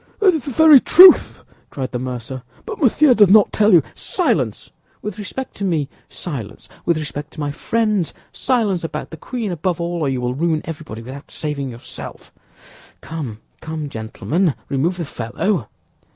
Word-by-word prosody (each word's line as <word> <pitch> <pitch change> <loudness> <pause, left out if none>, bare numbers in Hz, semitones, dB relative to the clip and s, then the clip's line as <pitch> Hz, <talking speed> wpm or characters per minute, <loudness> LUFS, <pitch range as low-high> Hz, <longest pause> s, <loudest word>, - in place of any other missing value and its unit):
"That 385 -3 +5
is 315 -5 -3
the - - -3
very 300 +2 +7
truth," 365 +8 +7 0.3
cried 130 -2 -5
the 125 - -3
mercer; 125 0 -5 0.2
"but - - -7
Monsieur 275 +1 +5
does 210 -5 +5
not 210 +1 +5
tell 215 0 +4
you—" 170 -6 +6
"Silence, - - -1 0.3
with 210 -1 -5
respect 255 +6 -6
to - - -5
me, 160 -7 0 0.2
silence, 120 - -7 0.2
with 170 -2 +3
respect 150 -1 -5
to - - -11
my 145 -1 -2
friends; 210 -1 0 0.2
silence 215 -9 0
about 165 - -5
the 160 - -8
queen, 225 - -4
above 175 +1 -2
all, 170 0 -2
or 150 -4 0
you 130 -1 -1
will 125 0 -1
ruin 160 +2 0
everybody 150 -8 -7
without 135 +4 -10
saving 145 -3 -4
yourself! 120 -1 -10 0.7
Come, 140 -10 -6 0.2
come, 155 -2 -5
gentlemen, 140 - -1
remove 160 +7 0
the 170 - -3
fellow." 125 - -2
165 Hz, 165 wpm, -20 LUFS, 135-205 Hz, 0.7 s, very